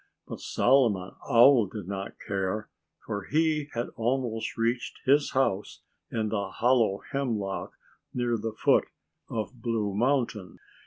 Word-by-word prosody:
But - - -7
Solomon 115 -8 +2 0.2
Owl 120 -2 +7
did 100 -2 -7
not 100 0 -5
care, 100 +2 -2 0.4
for 105 -3 -4
he 155 -1 +1
had 120 +1 -2
almost 120 -1 -2
reached 115 +2 -1
his 145 +2 +3
house 105 -7 0 0.3
in 110 -2 -1
the 100 -2 -2
hollow 115 -3 +2
hemlock 110 -8 -2 0.4
near 120 -1 0
the 110 0 -3
foot 110 - +3 0.4
of 115 +2 -4
Blue 110 -4 -1
Mountain. 115 - 0
115 Hz, 125 wpm, -28 LUFS, 100-125 Hz, 0.4 s, Owl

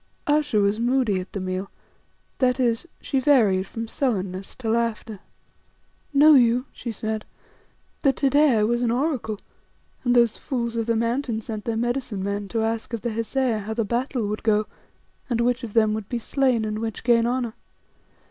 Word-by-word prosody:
Ayesha 295 -5 +2
was 200 +1 +2
moody 240 -5 +2
at 185 - -8
the 200 - -4
meal, 185 +1 -3 0.7
that 255 0 +2
is, 240 +5 +1
she 270 - 0
varied 220 -9 +3
from 225 +2 -5
sullenness 195 -7 -2
to 245 - -6
laughter. 225 -2 -1 0.9
"Know 300 +2 +7
you," 245 -1 +4
she 235 - -6
said, 220 0 -3 0.8
"that 275 -3 +3
to 275 -2 +1
day 290 -4 +5
I 210 - +3
was 240 +3 +1
an 240 - +1
Oracle, 245 -4 -1 0.7
and 245 -1 +2
those 235 -2 +4
fools 235 -4 -3
of 230 0 -1
the 230 - +2
Mountain 230 0 -1
sent 215 -1 -6
their 230 -1 -1
medicine 240 -4 -2
men 200 0 -2
to 225 +2 -1
ask 225 +1 -2
of 230 - -3
the 240 - -1
Hesea 230 +1 0
how 215 +2 -5
the 230 -1 0
battle 240 0 -1
would 210 +1 -3
go 215 -1 +2 0.6
and 235 -2 0
which 245 +1 +1
of 220 -3 -6
them 215 -2 +3
would 215 -2 -5
be 245 - -1
slain, 250 -1 +1
and 215 0 -3
which 225 -1 -4
gain 235 -1 +4
honour. 245 -2 -1
230 Hz, 185 wpm, -24 LUFS, 215-250 Hz, 0.9 s, Know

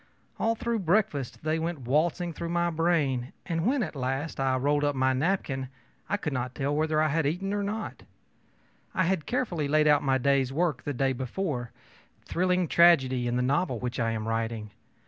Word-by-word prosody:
All 225 +1 +2
through 235 0 -1
breakfast 175 - 0
they 155 +1 0
went 165 -2 -3
waltzing 165 +7 0
through 170 +2 -5
my 170 0 +1
brain; 155 -6 0
and 165 +1 -1
when, 265 -1 +2
at 165 - -5
last, 135 +4 -3
I 135 -1 +2
rolled 145 +3 +1
up 145 -1 +1
my 130 0 +2
napkin, 135 -3 -1 0.4
I 205 - +1
could 150 -8 -3
not 125 0 -3
tell 145 +1 -1
whether 155 0 +1
I 155 0 +3
had 160 -1 +1
eaten 180 +6 -2
anything 205 - 0
or - - -1
not. 210 +2 -4 0.9
I 185 - +3
had 180 -3 0
carefully 215 - -1
laid 155 +1 +3
out 150 -1 +5
my 135 -1 +2
day's 135 0 +2
work 155 -2 0
the 145 - -2
day 135 +1 +1
before 130 0 -3 0.6
thrilling 180 0 +1
tragedy 130 -8 +4
in 120 - 0
the 125 - +1
novel 140 0 +1
which 125 +2 -4
I 115 -1 +1
am 110 0 -3
writing. 115 -1 -2
150 Hz, 195 wpm, -28 LUFS, 130-175 Hz, 0.9 s, out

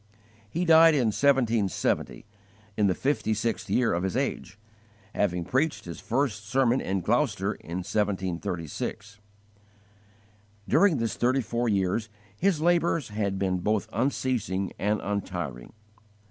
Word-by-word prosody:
He 175 +8 -1
died 165 -1 +7
in 125 -6 +2
1770, 115 -7 +1 0.5
in 105 -2 +2
the 90 - +1
fifty 130 -6 0
sixth 115 +2 -2
year 125 -2 +2
of 85 - 0
his 95 -1 -1
age, - - -3 0.6
having 90 -4 0
preached 130 - 0
his 85 -1 -7
first 120 -4 -1
sermon 130 0 +2
in 95 0 -1
Gloucester - - 0
in 90 +3 -6
1736. 95 0 -3 1.5
During 200 -7 +4
this 115 -2 -1
thirty 130 +2 +2
four 120 +1 -1
years 100 +2 0 0.3
his 180 - +1
labours 170 -5 +1
had 100 -2 -2
been 95 -1 0
both 105 +2 0
unceasing 115 -6 -1
and 105 +1 +1
untiring. 90 -11 -4
105 Hz, 125 wpm, -27 LUFS, 95-130 Hz, 1.5 s, died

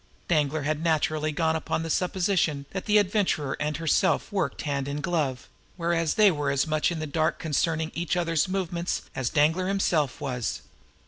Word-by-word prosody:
Danglar 155 -2 +1
had 155 +1 -1
naturally 155 -1 +1
gone 160 +1 +1
upon 160 0 -2
the 165 - -3
supposition 180 -6 0
that 190 +2 -5
the 210 0 +5
Adventurer 190 -8 +1
and 150 0 -1
herself 165 -2 +1
worked 200 -2 -2
hand 140 -2 -2
in 140 +1 -3
glove; 150 -6 -1 0.3
whereas 165 -2 0
they 210 -2 +6
were 145 -3 -1
as 140 -1 +1
much 155 +1 +1
in 170 - -3
the 155 - -3
dark 155 +1 0
concerning 160 +1 -1
each 170 +1 -1
other's 165 -2 +1
movements 180 -2 -2
as 130 -3 -1
Danglar 160 +5 +2
himself 170 -9 +1
was. 125 -4 -3
160 Hz, 175 wpm, -26 LUFS, 150-175 Hz, 0.3 s, they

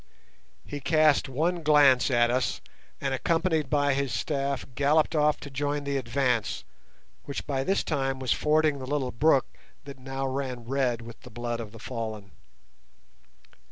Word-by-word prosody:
He 145 - -6
cast 155 -1 +3
one 165 +6 0
glance 145 -5 +5
at 120 -2 +3
us, 125 +1 0 0.4
and 135 -1 -2
accompanied 165 +2 0
by 145 -2 +2
his 135 -1 -1
staff 140 +4 -2
galloped 150 +5 +2
off 150 0 +3
to 140 - -8
join 145 +1 -2
the 140 0 -2
advance, 125 -3 0 0.6
which 140 - -5
by 135 -2 -1
this 195 +6 +1
time 135 -3 -1
was 130 -1 0
fording 155 -1 +2
the 130 - -7
little 135 -3 -1
brook 140 +1 +3 0.4
that 140 -2 -10
now 135 +1 -4
ran 130 -3 -3
red 125 -2 0
with 115 -1 -11
the - - -12
blood 120 0 -4
of 110 -3 -7
the 115 - -12
fallen. 110 -4 -6
135 Hz, 155 wpm, -27 LUFS, 125-145 Hz, 0.6 s, glance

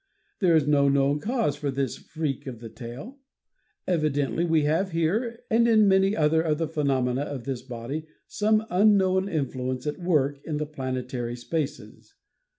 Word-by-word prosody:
There 175 -5 +4
is 155 -3 +3
no 140 -1 +4
known 140 +1 +2
cause 225 - 0
for 145 -1 -3
this 135 -1 -2
freak 145 -3 -4
of 125 -3 -6
the 115 -1 -8
tail. 125 - -9 0.7
Evidently 150 -5 0
we 160 -3 +2
have 165 +5 0
here, 220 +9 -1
and 230 +1 +4
in 215 -3 +5
many 195 +1 +4
other 160 +1 +3
of 155 -2 0
the 165 0 -1
phenomena 135 -4 0
of 145 -4 -5
this 135 -2 -4
body, 130 +6 -6 0.2
some 215 +1 +1
unknown 190 0 +3
influence 130 -5 -2
at 150 +3 -3
work 145 -6 +1
in 155 -2 -3
the 150 - -2
planetary 130 -4 -4
spaces. 145 +4 -5
150 Hz, 160 wpm, -26 LUFS, 135-185 Hz, 0.7 s, in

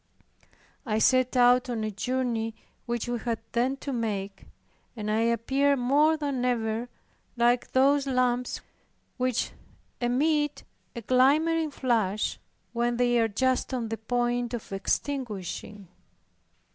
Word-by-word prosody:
I 220 -6 -1
set 255 +3 +3
out 245 +1 +5
on 230 -3 -2
a 215 - -2
journey, 230 0 -2 0.3
which 240 0 -2
we 240 -1 -2
had 230 0 -2
then 255 +3 0
to 280 - -4
make, 205 -4 -3 0.5
and 215 -2 -3
I 215 - +2
appeared 265 +5 +2
more 290 +6 +3
than 280 -4 -2
ever 230 -1 -1 0.5
like 240 +1 +2
those 275 +2 +4
lamps 250 -1 0 0.6
which 255 -2 0 0.5
emit 295 +4 +1 0.3
a 235 - -5
glimmering 305 +7 +3
flash, 225 -7 0 0.3
when 240 0 0
they 245 -1 +3
are 225 - +3
just 260 +4 0
on 235 -3 -3
the 225 - -3
point 240 +1 -1
of 225 - -9
extinguishing. 205 - -3
245 Hz, 125 wpm, -27 LUFS, 225-260 Hz, 0.6 s, out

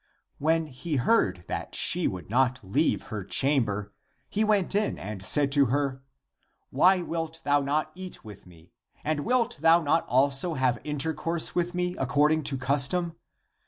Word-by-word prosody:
When 160 +2 +1
he 150 +3 -5
heard 185 - +1
that - - -5
she 180 -1 +4
would 90 -2 -6
not 125 +3 +1
leave 135 +12 0
her 105 -3 -4
chamber, 105 -4 0 0.4
he 215 - 0
went 210 -4 +1
in 205 +1 0
and 100 -1 -7
said 140 +7 +3
to 140 -1 +4
her, 135 +1 -1 0.3
" - - -57 0.3
Why 180 +6 +3
wilt 165 -1 -5
thou 145 0 +2
not 145 +3 -1
eat 185 -5 -10
with 105 -3 -12
me? 85 -1 -19 0.3
And 155 0 -1
wilt 240 +5 0
thou 165 +2 +4
not 155 +3 +1
also 140 +6 +2
have 130 -2 0
intercourse 160 +2 -1
with 175 0 -2
me 180 0 -2
according 150 +4 +1
to 135 - -1
custom? 145 +6 0
145 Hz, 160 wpm, -26 LUFS, 130-170 Hz, 0.4 s, she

